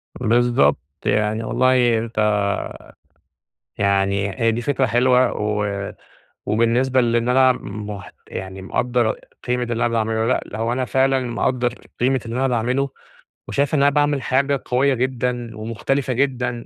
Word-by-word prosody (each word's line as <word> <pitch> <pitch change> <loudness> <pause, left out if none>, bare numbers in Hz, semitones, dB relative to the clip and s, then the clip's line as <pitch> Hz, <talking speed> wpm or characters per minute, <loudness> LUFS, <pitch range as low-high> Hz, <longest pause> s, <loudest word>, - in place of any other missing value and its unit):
بالضبط. 120 -9 +2 0.3
يعني 105 +1 +1
والله 125 0 +3
أنت 115 0 -5 1.6
يعني 100 0 +1
هي 115 0 +3
دي 120 +2 -3
فكرة 135 0 +1
حلوة، 125 +1 +3
و 105 -1 -2 0.5
وبالنسبة 120 +4 +2
لإن 120 0 +1
أنا 130 +1 +5
مح 105 -1 -7 0.2
يعني 95 0 -7
مقدر 120 +3 0 0.3
قيمة 125 0 0
اللي 120 0 -3
أنا 115 +1 +1
باعمله. 110 -1 0
لأ، 115 -3 -2
هو 115 +1 0
أنا 130 +1 0
فعلًا 135 +1 +2
مقدر 125 0 -1 0.3
قيمة 130 +2 +2
اللي 115 +1 -4
أنا 135 +1 +1
باعمله، 125 +3 0 0.6
وشايف 140 +2 0
إن 140 - +2
أنا 140 - +6
باعمل 145 -1 +1
حاجة 135 +2 +1
قويّة 135 +3 +2
جدًا، 125 -2 -2
ومختلفة 120 +5 -2
جدًا. 125 -2 -1
120 Hz, 135 wpm, -21 LUFS, 110-130 Hz, 1.6 s, أنا